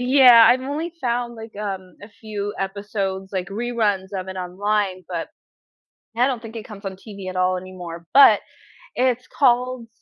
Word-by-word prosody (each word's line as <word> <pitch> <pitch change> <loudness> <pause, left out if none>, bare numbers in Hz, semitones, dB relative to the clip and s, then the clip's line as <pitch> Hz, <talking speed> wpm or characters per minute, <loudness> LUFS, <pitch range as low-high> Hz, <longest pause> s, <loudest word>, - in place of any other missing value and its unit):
Yeah, 250 -2 +8
I've 255 - +4
only 305 +5 -3
found, 240 -1 -1
like, 225 -1 -10
um, 190 -3 -5
a 205 - -10
few 205 -2 -6
episodes, 195 -1 -3
like 185 -1 -3
reruns 210 -3 -1
of 185 0 -6
it 190 - -6
online, 185 +1 -1
but 170 -3 -4 0.9
I 245 +2 +4
don't 250 -4 -3
think 225 0 -9
it 220 - -6
comes 205 -1 -11
on 190 -1 -5
TV 195 -1 -9
at 185 - -5
all 185 0 +2
anymore, 175 -2 -9
but 275 0 +8 0.6
it's 250 -1 +1
called 250 -2 +1
205 Hz, 170 wpm, -22 LUFS, 190-240 Hz, 0.9 s, Yeah